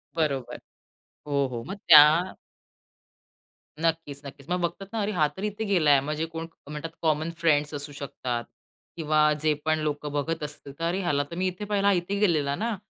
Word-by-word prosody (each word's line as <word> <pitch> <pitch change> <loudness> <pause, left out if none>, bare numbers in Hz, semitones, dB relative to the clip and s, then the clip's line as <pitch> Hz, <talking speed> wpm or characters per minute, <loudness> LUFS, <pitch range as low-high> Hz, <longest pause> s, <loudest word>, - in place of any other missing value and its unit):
बरोबर. 140 -6 -1 0.7
हो, 140 -2 +1
हो, 115 -1 -4
मग 195 - -5
त्या 160 +3 +8 1.5
नक्कीच, 165 -4 -1
नक्कीच. 140 +2 -11
मग 180 0 0
बघतात 175 +3 -3
ना, 225 - -2
अरे 210 +1 -1
हा 155 -5 +3
तर 190 - -7
इथे 210 +1 -3
गेला 175 -8 +3
आहे. 140 - +6
म्हणजे 150 +3 -2
कोण 165 0 -5 0.2
म्हणतात, 150 +2 -5
कॉमन 155 +1 +1
फ्रेंड्स 150 -2 +2
असू 145 0 -5
शकतात 125 -4 -4 0.5
किंवा 155 -1 +3
जे 155 -1 +3
पण 155 0 +2
लोकं 150 -1 -3
बघत 150 +2 -2
असतील 145 -1 -6
तर 165 - -3
अरे 175 +3 0
ह्याला 145 -5 +1
तर 170 - -7
मी 185 +1 0
इथे 185 +3 -3
पहिला, 200 -1 0
हा 200 - +6
इथे 190 +3 -1
गेलेला 155 -8 +2
ना? 225 -1 -2
155 Hz, 185 wpm, -26 LUFS, 145-180 Hz, 1.5 s, त्या